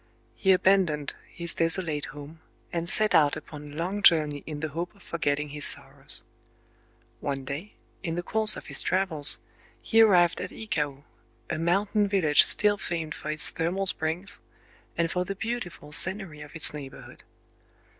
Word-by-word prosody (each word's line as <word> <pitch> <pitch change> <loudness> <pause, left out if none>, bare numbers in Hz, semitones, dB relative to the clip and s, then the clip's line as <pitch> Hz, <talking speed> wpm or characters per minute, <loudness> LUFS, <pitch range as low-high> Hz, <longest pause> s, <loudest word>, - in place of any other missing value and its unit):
He 190 - +1
abandoned 180 -6 +1 0.2
his 170 -1 -4
desolate 165 -3 -2
home, 150 +3 -12 0.3
and 170 0 -3
set 215 0 +2
out 145 -2 +4
upon 150 -1 -11
a - - -12
long 185 +6 -3
journey 150 -6 +3
in 150 -2 -6
the 155 +1 -4
hope 170 +6 -6
of 200 - -21
forgetting 150 -3 -2
his 145 0 -5
sorrows. 135 -1 -3 1.0
One 135 -2 -4
day, 150 +10 -7 0.3
in 165 -3 -4
the 175 - -4
course 215 +2 +6
of - - -10
his - - -2
travels, 175 -6 +7 0.4
he 225 0 +2
arrived 180 -6 +4
at - - -5
Ikao,—a 150 -6 -7
mountain 200 +5 0
village 180 -7 +4
still 205 -1 +2
famed 165 -3 -4
for 150 - -8
its 155 0 -1
thermal 180 +4 -2
springs, 180 +3 -2 0.6
and 165 0 0
for 180 - -1
the 195 +2 -6
beautiful 195 -8 -6
scenery 185 -2 -2
of 150 +1 -12
its 155 - +6
neighborhood. 140 -3 -11
165 Hz, 155 wpm, -26 LUFS, 150-190 Hz, 1.0 s, travels